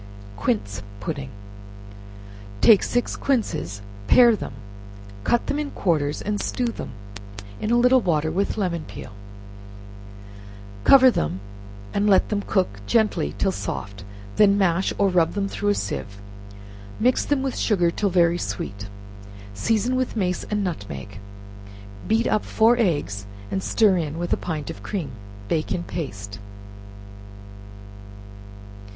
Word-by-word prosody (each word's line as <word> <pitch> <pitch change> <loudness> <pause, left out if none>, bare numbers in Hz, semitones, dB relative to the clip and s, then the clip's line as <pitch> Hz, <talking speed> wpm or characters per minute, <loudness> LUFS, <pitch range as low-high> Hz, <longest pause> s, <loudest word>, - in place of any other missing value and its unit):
Quince 100 -1 -1 0.2
Pudding 140 0 -4 1.3
Take 210 - +7
six 245 0 -1
quinces, 100 - -1 0.2
pare 240 -2 +7
them, 165 - -6 0.7
cut 240 - +2
them 290 - -1
in 300 -1 -2
quarters, 150 - 0
and 205 0 -1
stew 250 - -1
them, 230 - -4 0.7
in 215 - -2
a 240 - +4
little 250 +1 +5
water 160 -5 +1
with 195 +6 -1
lemon 175 -5 -1
peel; - - -9 1.7
cover 260 -2 +8
them 90 - -2 0.5
and 205 +1 +2
let 190 - +4
them 210 -1 0
cook 145 - -1
gently 220 -2 +1
till 195 - +1
soft, 100 - -5 0.3
when 200 -1 +5
mash, 190 -1 +2
or 200 - +3
rub 175 -3 +2
them 200 -1 -1
through 205 +1 -2
a 205 - +3
sieve; 100 - -4 0.8
mix 250 +3 +3
them 285 -2 0
with 265 -2 -2
sugar 175 -6 +2
till 200 +3 0
very 175 -1 +3
sweet, 100 0 -5 0.7
season 225 - 0
with 255 -1 -1
mace 180 -4 -1
and 210 -1 -1
nutmeg; 100 - -5 0.9
beat 225 +2 +2
up 215 - +1
four 225 +2 +4
eggs 145 - 0 0.2
and 190 - -1
stir 205 -2 +3
in 155 -2 -3
with 175 0 -1
a - - +4
pint 155 -4 -4
of - - -11
cream; 175 -10 -4 0.4
bake 155 +6 -1
it - - +2
in 175 - -3
paste. 100 - -6
185 Hz, 135 wpm, -23 LUFS, 145-215 Hz, 1.7 s, cover